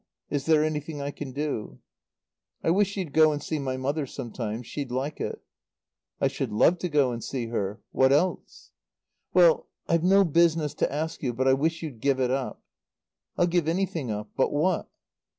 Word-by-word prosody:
Is 140 Hz, 0 st, -2 dB
there 155 Hz, -1 st, +5 dB
anything 155 Hz, -1 st, -3 dB
I 140 Hz, 0 st, -3 dB
can 140 Hz, -2 st, -7 dB
do?" 140 Hz, -5 st, -3 dB, 0.9 s
"I 165 Hz, -, +3 dB
wish 200 Hz, +2 st, +2 dB
you'd 180 Hz, -7 st, -4 dB
go 155 Hz, -1 st, +6 dB
and 145 Hz, -, -2 dB
see 155 Hz, -, -2 dB
my 130 Hz, -2 st, -2 dB
mother 140 Hz, +2 st, -1 dB
some 125 Hz, -3 st, -7 dB
time. 115 Hz, 0 st, -4 dB
She'd 140 Hz, +3 st, -5 dB
like 135 Hz, +4 st, -3 dB
it." -, -, -4 dB, 0.8 s
"I -, -, +3 dB
should 135 Hz, -3 st, -3 dB
love 170 Hz, +11 st, +4 dB
to 180 Hz, -, -2 dB
go 145 Hz, -4 st, +3 dB
and 115 Hz, -1 st, -5 dB
see 120 Hz, -4 st, -3 dB
her. 105 Hz, -3 st, -3 dB
What 130 Hz, 0 st, +4 dB
else?" 165 Hz, +5 st, 0 dB, 0.6 s
"Well 175 Hz, -3 st, +5 dB, 0.2 s
I've 170 Hz, -1 st, +2 dB
no 195 Hz, +2 st, +6 dB
business 165 Hz, -2 st, +2 dB
to -, -, +2 dB
ask 155 Hz, +3 st, -3 dB
you, 125 Hz, -4 st, -1 dB
but 130 Hz, +3 st, 0 dB
I 130 Hz, -, +6 dB
wish 160 Hz, +5 st, 0 dB
you'd 140 Hz, -8 st, -6 dB
give 135 Hz, -1 st, +2 dB
it 125 Hz, -1 st, +1 dB
up." 135 Hz, 0 st, -3 dB, 0.7 s
"I'll 175 Hz, -, +4 dB
give 175 Hz, -2 st, +1 dB
anything 165 Hz, -6 st, -1 dB
up. 105 Hz, 0 st, -4 dB
But 135 Hz, -, +2 dB
what?" 165 Hz, +5 st, 0 dB
145 Hz, 190 wpm, -27 LUFS, 130-165 Hz, 0.9 s, go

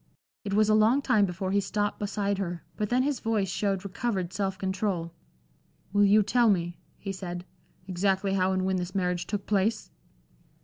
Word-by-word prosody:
It 200 Hz, -1 st, -2 dB
was 215 Hz, 0 st, +4 dB
a 215 Hz, -, +4 dB
long 225 Hz, +6 st, +4 dB
time 215 Hz, -7 st, +3 dB
before 185 Hz, +1 st, -3 dB
he 200 Hz, -, +3 dB
stopped 205 Hz, +1 st, -1 dB
beside 200 Hz, -1 st, -1 dB
her, 175 Hz, -3 st, -3 dB
but 210 Hz, -1 st, -2 dB
then 250 Hz, +1 st, +3 dB
his 280 Hz, -2 st, 0 dB
voice 215 Hz, -4 st, 0 dB
showed 195 Hz, 0 st, -1 dB
recovered 190 Hz, -3 st, -2 dB
self 190 Hz, -1 st, -1 dB
control. 190 Hz, -3 st, -2 dB, 0.8 s
"Will 205 Hz, 0 st, +4 dB
you 210 Hz, +2 st, +5 dB
tell 235 Hz, +3 st, +3 dB
me," 175 Hz, -3 st, 0 dB, 0.2 s
he 195 Hz, -, -5 dB
said, 180 Hz, -2 st, -6 dB, 0.4 s
"exactly 195 Hz, +1 st, +1 dB
how 190 Hz, -1 st, +2 dB
and 185 Hz, 0 st, 0 dB
when 190 Hz, 0 st, +1 dB
this 180 Hz, +1 st, -4 dB
marriage 180 Hz, -2 st, 0 dB
took 205 Hz, -2 st, -3 dB
place?" 210 Hz, +2 st, 0 dB
195 Hz, 180 wpm, -28 LUFS, 185-210 Hz, 0.8 s, you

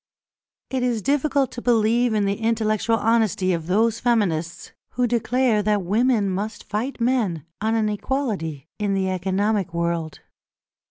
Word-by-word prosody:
It 260 Hz, -1 st, -1 dB
is 240 Hz, -4 st, 0 dB
difficult 280 Hz, -1 st, +1 dB
to 240 Hz, -, -7 dB
believe 235 Hz, 0 st, +2 dB
in 205 Hz, -1 st, +2 dB
the 200 Hz, -, +1 dB
intellectual 225 Hz, 0 st, +1 dB
honesty 215 Hz, -4 st, +1 dB
of 165 Hz, -1 st, -3 dB
those 220 Hz, +4 st, +2 dB
feminists 180 Hz, -9 st, 0 dB, 0.2 s
who 250 Hz, -, +1 dB
declare 240 Hz, -1 st, +1 dB
that 210 Hz, -1 st, +1 dB
women 215 Hz, +3 st, +2 dB
must 200 Hz, +3 st, -3 dB
fight 230 Hz, +7 st, -3 dB
men 230 Hz, -, 0 dB, 0.2 s
on 220 Hz, +1 st, +1 dB
an 220 Hz, -1 st, +1 dB
equality 210 Hz, -, -3 dB
in 205 Hz, -2 st, 0 dB
the 190 Hz, -1 st, 0 dB
economic 190 Hz, 0 st, -1 dB
world. 170 Hz, -2 st, -2 dB
215 Hz, 145 wpm, -23 LUFS, 190-235 Hz, 0.2 s, believe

